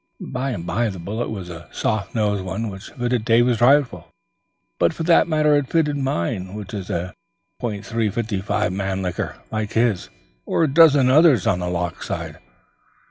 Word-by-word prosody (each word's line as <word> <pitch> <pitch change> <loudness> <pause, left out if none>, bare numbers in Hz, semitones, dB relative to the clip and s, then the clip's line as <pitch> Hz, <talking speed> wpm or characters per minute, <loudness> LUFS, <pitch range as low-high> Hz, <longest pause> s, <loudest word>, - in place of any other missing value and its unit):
By 130 +1 -3
the - - -4
by, 100 +7 -1
the 95 - -6
bullet 105 +7 -4
was 95 -5 -6
a 85 0 -10
soft 110 -5 -2
nosed 105 -3 0
one 110 +4 -3
which 95 +1 -9
fitted 120 -2 -1
David's 120 +1 +3
rifle; 135 +1 +3 0.7
but 85 - +3
for 165 - -4
that 170 +1 +4
matter 155 -2 +3
it 145 -3 0
fitted 155 -3 +1
mine 95 -7 -2
which 105 -2 -8
is 95 -3 -5
a 90 +1 -3 0.5
.355 110 -2 -2 0.3
Mannlicher 95 -2 -3 0.2
like 110 -1 -3
his 115 -5 +1 0.3
or - - 0
a - - +3
dozen 145 -5 +6
others 145 - +5
on 90 - +2
the 90 0 -2
loch 85 -1 -3
side. - - -5
110 Hz, 165 wpm, -22 LUFS, 95-130 Hz, 0.7 s, dozen